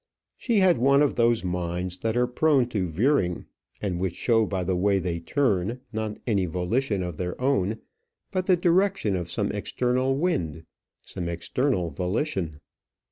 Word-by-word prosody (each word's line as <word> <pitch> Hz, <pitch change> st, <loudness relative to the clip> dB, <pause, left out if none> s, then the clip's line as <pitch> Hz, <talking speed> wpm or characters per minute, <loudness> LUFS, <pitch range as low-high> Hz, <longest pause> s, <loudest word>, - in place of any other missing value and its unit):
She 235 Hz, -3 st, 0 dB
had 180 Hz, -8 st, +4 dB
one 140 Hz, +3 st, +5 dB
of 145 Hz, -, +2 dB
those 115 Hz, -2 st, +2 dB
minds 90 Hz, 0 st, -3 dB
that 110 Hz, +4 st, -1 dB
are 125 Hz, -, +4 dB
prone 130 Hz, 0 st, +2 dB
to 100 Hz, -6 st, -1 dB
veering, 90 Hz, -, +1 dB, 0.4 s
and 90 Hz, -4 st, -1 dB
which 90 Hz, -2 st, -2 dB
show 115 Hz, -3 st, +2 dB
by 95 Hz, -2 st, -2 dB
the 90 Hz, +1 st, 0 dB
way 100 Hz, +2 st, +2 dB
they 85 Hz, -2 st, -2 dB
turn, 115 Hz, -, 0 dB
not 110 Hz, -1 st, -3 dB
any 100 Hz, -6 st, +1 dB
volition 95 Hz, +5 st, -1 dB
of 90 Hz, -3 st, -5 dB
their 90 Hz, -1 st, -4 dB
own, 120 Hz, -6 st, +1 dB, 0.5 s
but 185 Hz, -2 st, -1 dB
the 185 Hz, -2 st, +5 dB
direction 175 Hz, -, +2 dB
of 85 Hz, -2 st, -3 dB
some -, -, -1 dB
external 130 Hz, +2 st, 0 dB
wind, 85 Hz, -, -1 dB, 0.4 s
some 85 Hz, -1 st, -5 dB
external 90 Hz, -, -1 dB
volition. 90 Hz, -, -2 dB
105 Hz, 160 wpm, -26 LUFS, 90-135 Hz, 0.5 s, one